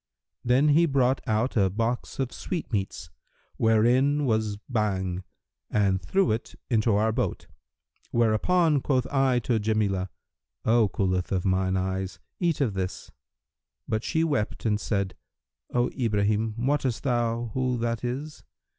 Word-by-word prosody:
'[FN#338] - - -63
Then 125 +5 +4
he 160 +4 +5
brought 135 -2 +2
out 110 +3 0
a 100 -4 +3
box 115 +5 -2
of 130 -2 -1
sweetmeats, 100 - -4 0.5
wherein 125 +6 +3
was 110 -4 0
Bhang 95 -6 -1 0.5
and 100 -3 +1
threw 195 - +1
it 110 +2 -3 0.2
into 110 -2 +3
our 110 +2 +2
boat: - - -2 0.6
whereupon 140 +8 +2
quoth 130 -3 +1
I 135 -2 +3
to 115 -1 +1
Jamilah, 105 -3 0 0.6
'O 115 -2 +4
coolth 90 -1 -1
of 95 -1 0
mine 95 0 +1
eyes, 95 0 -2 0.2
eat 170 -5 +1
of 120 -7 +1
this.' 95 -1 -4 0.8
But 110 +1 -1
she 160 - +1
wept 145 -11 -1
and 105 -2 +2
said, 100 -3 -1 0.6
'O 120 0 +1
Ibrahim, 110 -2 0
wottest 130 -1 0
thou 120 -3 0
who 130 -1 0
that 115 0 -2
is?' 140 +5 -4
115 Hz, 135 wpm, -26 LUFS, 100-130 Hz, 0.8 s, he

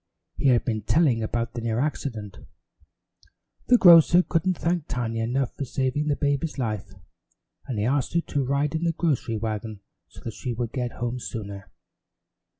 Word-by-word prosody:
He - - 0
had 125 -3 +4
been 110 -2 -1
telling 130 -1 +2
about 115 +1 -2
the 120 - -4
near 115 -1 -1
accident. 120 -8 -3 1.3
The 245 - +6
grocer 175 -2 +7
couldn't 180 +1 0
thank 170 -2 -1
Tiny 115 -2 -2
enough 120 +3 -1
for - - -4
saving 130 +3 -1
the 145 - +2
baby's 145 +2 -1
life, 105 -7 -3 0.7
and 125 -5 -3
he 105 - 0
asked 135 +4 0
her 170 - +4
to 145 -4 -2
ride 140 +2 0
in 160 +1 -2
the 165 -1 +1
grocery 145 -9 -1
wagon 110 -1 -4 0.3
so - - -15
that 115 - -6
she 125 +2 -4
would 115 -1 -3
get 125 -3 -3
home 120 +1 -3
sooner. 100 -5 -7
125 Hz, 170 wpm, -25 LUFS, 115-150 Hz, 1.3 s, grocer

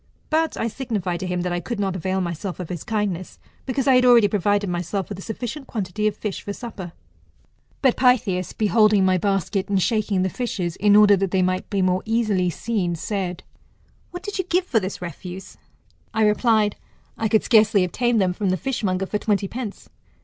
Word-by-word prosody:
But 320 +1 +1
I 225 - -1
signified 210 -8 -3
to 185 - -4
him 180 0 -1
that 180 0 -2
I 175 - -1
could 235 +4 -5
not 195 -2 -1
avail 190 +1 -1
myself 175 +2 -4
of 180 - -6
his 175 -4 -5
kindness, 205 -5 -3 0.3
because 265 0 -1
I 270 - +5
had 250 0 +5
already 240 -4 +6
provided 205 0 +1
myself 180 +2 -3
with 200 -2 -6
a - - -7
sufficient 245 +6 -6
quantity 210 0 -2
of 210 - -2
fish 210 -3 -4
for 205 - -5
supper. 200 -7 -8 0.9
But 260 -3 +4
Pytheas 210 -8 +2
beholding 215 -2 +3
my 185 -1 +3
basket', 195 0 -1
and 195 -1 +2
shaking 210 -2 +1
the 190 - 0
fishes, 185 -8 -3
in 205 0 +4
order 210 -1 +7
that 195 0 0
they 185 0 +1
might 185 0 -1
be 195 -2 0
more 185 0 +1
easily 215 -5 +1
seen, 180 0 -2
said, 180 0 -3 0.7
What 355 +1 -8
did 410 -1 -5
you - - +1
give 360 +1 +1
for 240 -10 +2
this 190 -2 -5
refuse? 180 +3 -8 0.6
I 220 -1 +3
replied, 210 -1 +2 0.4
1 220 - 0
could 220 - +3
scarcely 215 -4 +4
obtain 240 +6 0
them 185 -3 +2
from 195 +1 -1
the 185 - +1
fishmonger 200 -8 -1
for 210 +2 -2
twenty 205 -2 0
pence. 230 -2 -7
205 Hz, 200 wpm, -23 LUFS, 185-225 Hz, 0.9 s, order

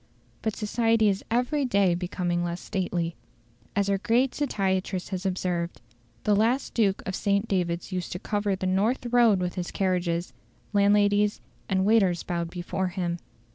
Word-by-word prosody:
But 220 -2 -1
society 225 0 +2
is 195 0 -1
every 250 +5 +1
day 200 -8 +3
becoming 175 0 -1
less 175 0 -3
stately. 175 -4 -2 0.6
As 200 0 +2
our 200 -1 +1
great 240 +5 +2
satirist 190 -8 -1
has 190 0 -2
observed, 180 -2 -2 0.4
"The 210 - +3
last 235 +6 +1
Duke 200 -4 +1
of 190 - -3
St. 200 +1 +1
David's 175 -2 -1
used 180 -2 -3
to - - -3
cover 205 +1 -1
the 185 - -4
north 205 +8 +1
road 235 -5 +5
with 180 -1 -2
his 180 -2 -4
carriages; 180 -2 -1 0.4
landladies 205 0 +3 0.3
and 190 -1 +2
waiters 195 -5 +3
bowed 170 -1 -2
before 180 +2 -3
him. 175 -2 -2
195 Hz, 155 wpm, -27 LUFS, 180-210 Hz, 0.6 s, road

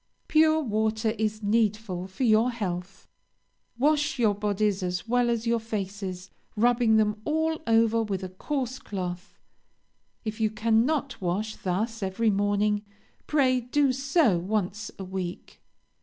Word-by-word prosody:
"Pure 315 0 +4
water 220 -1 0
is 215 0 -1
needful 210 -3 0
for 190 +7 -5
your 225 +1 +4
health. 190 -5 -5 0.7
Wash 295 +2 +2
your 220 -4 +3
bodies 205 -1 0
as 180 +2 -3
well 245 0 +2
as 235 -1 -1
your 235 0 +2
faces, 195 -4 -5 0.2
rubbing 235 0 +3
them 210 0 +1
all 320 +2 0
over 230 0 +4
with 200 -3 -3
a 185 - -4
coarse 255 +6 -3
cloth. 180 -1 -6 0.9
If 215 +1 -4
you 215 - +3
cannot 230 +6 +1
wash 195 +5 -2
thus 215 +5 -2
every 200 +3 +1
morning, 205 +1 +1 0.5
pray 260 -4 +3
do 265 +2 +2
so 270 - +2
once 205 +2 -2
a 195 - -6
week. 185 -1 -6
215 Hz, 135 wpm, -27 LUFS, 195-240 Hz, 0.9 s, Pure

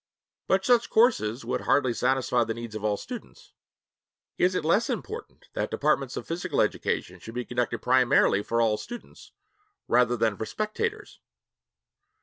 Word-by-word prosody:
But 190 +1 +2
such 240 -2 +3
courses 135 - +2
would - - -2
hardly 130 -4 +2
satisfy 125 -1 +1
the 115 0 -3
needs 115 -2 -7
of 110 -1 -6
all 105 -1 +1
students. 245 - -10 0.8
Is 185 +1 +2
it 155 - -1
less 205 +8 +2
important 450 +3 -6
that - - -2
departments - - 0
of - - -5
physical 170 +1 -2
education - - -1
should 115 - -10
be 125 0 -3
conducted 120 -2 -2
primarily 125 -5 +4
for 115 +3 -1
all 110 -2 +2
students 240 - -10 0.6
rather 120 0 +3
than 110 -2 +1
for 110 - -3
spectators? 215 - -3
125 Hz, 150 wpm, -27 LUFS, 115-190 Hz, 0.8 s, primarily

